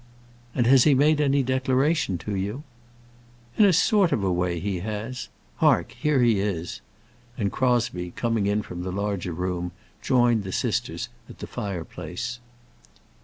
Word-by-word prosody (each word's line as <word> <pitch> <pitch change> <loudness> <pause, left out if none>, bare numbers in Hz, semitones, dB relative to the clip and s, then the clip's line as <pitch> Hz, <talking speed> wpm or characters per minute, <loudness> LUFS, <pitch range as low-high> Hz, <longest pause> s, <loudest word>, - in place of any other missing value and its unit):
"And 120 - +2
has 130 +1 +6
he 150 -3 +5
made 150 +3 +4
any 140 -1 +3
declaration 130 - +1
to 105 - -2
you?" 105 +9 -3 0.9
"In 210 - +6
a 200 - +6
sort 190 +1 +3
of 105 - 0
a 95 - +1
way 90 -1 0
he 95 +1 -2
has. 110 +6 -5 0.3
Hark, - - +3
here 150 -4 +1
he 115 -4 +3
is!" 95 -4 -3 0.6
And 100 -4 -1
Crosbie, 120 -9 0
coming 115 +1 -1
in 105 +1 +1
from 90 -2 -7
the 90 +1 -4
larger 100 -2 -2
room, 90 0 -3 0.3
joined 120 -4 +3
the 95 - -5
sisters - - -2 0.2
at - - -11
the - - -6
fireplace. 90 +4 -5
105 Hz, 155 wpm, -25 LUFS, 90-130 Hz, 0.9 s, has